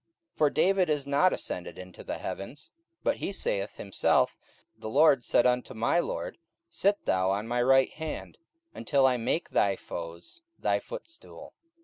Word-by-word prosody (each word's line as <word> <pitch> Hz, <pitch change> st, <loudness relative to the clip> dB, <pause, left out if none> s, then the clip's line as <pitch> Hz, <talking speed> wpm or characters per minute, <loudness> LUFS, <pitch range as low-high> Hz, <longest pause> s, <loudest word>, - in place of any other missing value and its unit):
44:002:034 -, -, -38 dB
For 150 Hz, -, +5 dB
David 190 Hz, +2 st, +2 dB
is 150 Hz, -2 st, 0 dB
not 145 Hz, +6 st, +3 dB
ascended 90 Hz, -, -4 dB
into 90 Hz, 0 st, -10 dB
the -, -, -4 dB
heavens: 115 Hz, +10 st, -7 dB, 0.3 s
but 285 Hz, -, +1 dB
he -, -, -3 dB
saith 100 Hz, -, -2 dB
himself, 100 Hz, -, +1 dB, 0.4 s
The 110 Hz, -, -7 dB
Lord 140 Hz, 0 st, +5 dB
said 120 Hz, -, +3 dB
unto 125 Hz, -1 st, +1 dB
my 115 Hz, +9 st, +2 dB
Lord, -, -, -4 dB, 0.3 s
Sit 205 Hz, +1 st, +1 dB
thou 95 Hz, 0 st, +2 dB
on 100 Hz, +3 st, -1 dB
my 120 Hz, +1 st, 0 dB
right 135 Hz, +1 st, +4 dB
hand, 160 Hz, -1 st, -6 dB, 0.3 s
44:002:035 -, -, -17 dB
Until 140 Hz, -2 st, +2 dB
I 130 Hz, -1 st, +4 dB
make 125 Hz, +8 st, -1 dB
thy 100 Hz, -1 st, +3 dB
foes 85 Hz, -, -8 dB, 0.2 s
thy -, -, +1 dB
footstool. -, -, -10 dB
130 Hz, 165 wpm, -28 LUFS, 100-160 Hz, 0.4 s, For